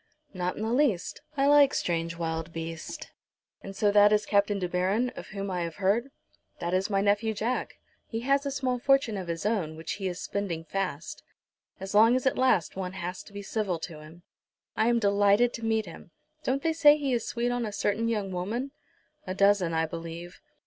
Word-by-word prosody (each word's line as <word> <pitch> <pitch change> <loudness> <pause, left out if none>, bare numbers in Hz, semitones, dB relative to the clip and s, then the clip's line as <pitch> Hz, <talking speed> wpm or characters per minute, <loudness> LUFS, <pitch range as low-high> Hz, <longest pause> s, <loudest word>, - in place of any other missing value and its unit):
"Not 180 -1 -2
in 215 - -3
the 225 +1 -1
least. 245 - +1 0.2
I 275 - +3
like 285 -1 +6
strange 165 -1 -1
wild 165 -1 -3
beasts. 165 -1 -6 0.6
And 195 - -9
so 205 +1 +2
that 205 0 +6
is 210 0 +2
Captain 205 0 +2
De 185 -2 -2
Baron, 190 +8 0
of - - -9
whom 195 -1 -5
I 180 -1 -2
have 170 -1 -4
heard?" 205 +7 +1 0.5
"That 170 +1 -2
is 190 +3 +1
my 195 -1 +1
nephew, 210 +2 +1
Jack. 235 +5 -2 0.3
He 225 - -4
has 275 +3 +2
a 280 - -2
small 260 -2 -1
fortune 270 -4 +3
of 190 -3 -5
his 165 +2 -4
own, 190 -8 0
which 160 - -5
he 190 - -1
is 180 0 -4
spending 190 -6 -3
fast. 180 -3 -4 0.6
As 195 +1 -6
long 225 +4 +6
as 255 - -1
it 265 - +2
lasts 255 -10 +2
one 185 -1 -4
has 180 -1 -5
to - - -15
be 200 0 -7
civil 200 -3 -1
to 160 -2 -7
him." 160 +3 -14 0.5
"I 220 - +2
am 240 0 +3
delighted 205 +2 +3
to 230 - -5
meet 220 -1 +1
him. 170 0 -11 0.3
Don't 270 +2 -1
they 325 - +2
say 300 -2 +6
he 280 -3 -1
is 235 -2 -1
sweet 240 +1 -1
on 245 0 -1
a 215 - -3
certain 205 +2 0
young 205 -4 -1
woman?" 220 +10 -3 0.6
"A 185 - -3
dozen, 200 -3 +3
I 160 0 +1
believe." 170 +2 -8
200 Hz, 210 wpm, -28 LUFS, 180-235 Hz, 0.6 s, like